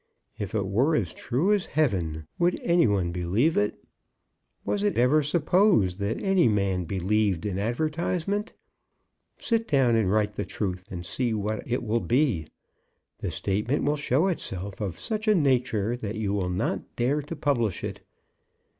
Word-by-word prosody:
If 100 Hz, 0 st, -4 dB
it 100 Hz, -3 st, 0 dB
were 125 Hz, +12 st, +2 dB
as -, -, -1 dB
true 145 Hz, -, +1 dB
as 205 Hz, -3 st, 0 dB
heaven, 85 Hz, -, 0 dB
would 175 Hz, +1 st, +2 dB
any 170 Hz, -5 st, +4 dB
one 95 Hz, -4 st, +1 dB
believe 90 Hz, -, +1 dB
it? 105 Hz, 0 st, 0 dB, 0.8 s
Was 205 Hz, -, 0 dB
it 205 Hz, -1 st, 0 dB
ever 125 Hz, +6 st, +4 dB
supposed 150 Hz, -, +2 dB
that 100 Hz, +3 st, -1 dB
any 190 Hz, -5 st, +3 dB
man 100 Hz, -4 st, +1 dB
believed 95 Hz, 0 st, 0 dB
an 100 Hz, -2 st, -2 dB
advertisement? 165 Hz, -, -1 dB, 0.8 s
Sit 230 Hz, -1 st, 0 dB
down 130 Hz, -5 st, +3 dB
and 105 Hz, -5 st, +2 dB
write 105 Hz, 0 st, +1 dB
the -, -, -3 dB
truth, 90 Hz, -3 st, -4 dB
and 90 Hz, -3 st, -6 dB
see 120 Hz, +3 st, -1 dB
what 105 Hz, +1 st, -2 dB
it 125 Hz, -, 0 dB
will 115 Hz, +1 st, +1 dB
be! 120 Hz, -, +1 dB, 0.7 s
The -, -, -3 dB
statement 105 Hz, +8 st, -1 dB
will 145 Hz, +1 st, +2 dB
show 145 Hz, +2 st, +1 dB
itself 100 Hz, -, -3 dB
of 95 Hz, -4 st, -3 dB
such 220 Hz, -1 st, -3 dB
a 215 Hz, -, +5 dB
nature 125 Hz, -, +1 dB
that 110 Hz, -3 st, -5 dB
you 105 Hz, -2 st, -1 dB
will 95 Hz, -3 st, -1 dB
not 90 Hz, +5 st, -2 dB
dare 135 Hz, +5 st, +1 dB
to 145 Hz, +4 st, -7 dB
publish 120 Hz, -, 0 dB
it. -, -, -4 dB
115 Hz, 165 wpm, -26 LUFS, 100-155 Hz, 0.8 s, a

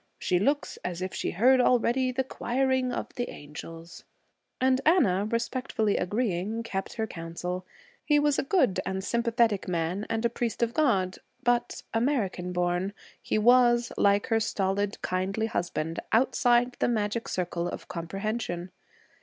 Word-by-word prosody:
She 180 Hz, -, +1 dB
looks 285 Hz, +8 st, 0 dB
as 180 Hz, 0 st, -3 dB
if 185 Hz, -, -4 dB
she -, -, -2 dB
heard 255 Hz, +7 st, +4 dB
already 250 Hz, +1 st, +2 dB
the 265 Hz, +1 st, 0 dB
choiring 260 Hz, 0 st, 0 dB
of -, -, -4 dB
the 245 Hz, 0 st, -3 dB
angels.' 165 Hz, +3 st, -10 dB, 0.6 s
And 260 Hz, +1 st, +3 dB
Anna, 210 Hz, -, +3 dB
respectfully 230 Hz, -2 st, -1 dB
agreeing, 210 Hz, +1 st, -1 dB
kept 195 Hz, -4 st, -4 dB
her 220 Hz, -, -2 dB
counsel. 180 Hz, 0 st, -5 dB, 0.4 s
He 295 Hz, -, +3 dB
was 290 Hz, -1 st, +2 dB
a -, -, +1 dB
good 270 Hz, -, +2 dB
and 190 Hz, 0 st, -3 dB
sympathetic 235 Hz, -2 st, +1 dB
man 175 Hz, +3 st, -1 dB
and 225 Hz, +1 st, -1 dB
a -, -, +4 dB
priest 235 Hz, 0 st, -2 dB
of 235 Hz, 0 st, 0 dB
God, 195 Hz, -12 st, +1 dB, 0.2 s
but, 240 Hz, 0 st, 0 dB
American 225 Hz, -7 st, 0 dB
born, 180 Hz, +2 st, 0 dB, 0.3 s
he -, -, -1 dB
was, 240 Hz, +1 st, +5 dB
like 200 Hz, 0 st, +3 dB
her 225 Hz, -1 st, +3 dB
stolid, 200 Hz, -1 st, -1 dB
kindly 190 Hz, +4 st, -1 dB
husband, 170 Hz, -6 st, -2 dB
outside 245 Hz, +1 st, +3 dB
the -, -, +2 dB
magic 225 Hz, -1 st, -1 dB
circle 175 Hz, -1 st, -2 dB
of -, -, -6 dB
comprehension. 185 Hz, +1 st, -4 dB
220 Hz, 145 wpm, -28 LUFS, 185-245 Hz, 0.6 s, was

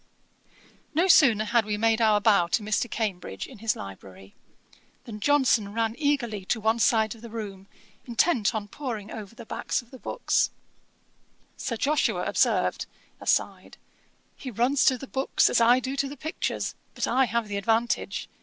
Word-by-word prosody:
No 345 Hz, +4 st, +3 dB
sooner 240 Hz, -, +6 dB
had 235 Hz, +2 st, +2 dB
we 210 Hz, 0 st, -2 dB
made 225 Hz, +1 st, +2 dB
our 215 Hz, -2 st, +4 dB
bow 205 Hz, -5 st, +4 dB
to 210 Hz, +5 st, 0 dB
Mr. 215 Hz, +3 st, 0 dB
Cambridge, 210 Hz, -6 st, -3 dB
in 255 Hz, -6 st, -13 dB
his 220 Hz, 0 st, 0 dB
library, 95 Hz, 0 st, -11 dB, 0.7 s
than 215 Hz, -3 st, -8 dB
Johnson 240 Hz, -6 st, +2 dB
ran 225 Hz, -1 st, 0 dB
eagerly 255 Hz, -9 st, -1 dB
to 225 Hz, -, 0 dB
one 220 Hz, +2 st, +1 dB
side 220 Hz, -1 st, +3 dB
of 225 Hz, -, -16 dB
the 235 Hz, -, -9 dB
room, 200 Hz, -4 st, -7 dB, 0.4 s
intent 240 Hz, -, +1 dB
on 210 Hz, -1 st, -3 dB
poring 220 Hz, -4 st, -6 dB
over 215 Hz, 0 st, -8 dB
the 235 Hz, -1 st, -10 dB
backs -, -, -2 dB
of 235 Hz, -, -25 dB
the 260 Hz, -, -11 dB
books. -, -, 0 dB, 1.1 s
Sir 230 Hz, -, -4 dB
Joshua 295 Hz, +6 st, +1 dB
observed, -, -, +1 dB, 0.3 s
(aside,) -, -, -1 dB, 0.6 s
'He 265 Hz, -, -7 dB
runs 250 Hz, +5 st, +1 dB
to 265 Hz, -4 st, +4 dB
the 270 Hz, -, -8 dB
books, 265 Hz, 0 st, +1 dB
as -, -, +3 dB
I 240 Hz, +2 st, +6 dB
do 260 Hz, +1 st, -4 dB
to 275 Hz, 0 st, 0 dB
the 285 Hz, -, -9 dB
pictures: 315 Hz, +7 st, -3 dB, 0.2 s
but -, -, -1 dB
I 265 Hz, 0 st, +3 dB
have 235 Hz, -1 st, -1 dB
the 205 Hz, -1 st, -3 dB
advantage. 225 Hz, +4 st, 0 dB
230 Hz, 170 wpm, -26 LUFS, 210-255 Hz, 1.1 s, sooner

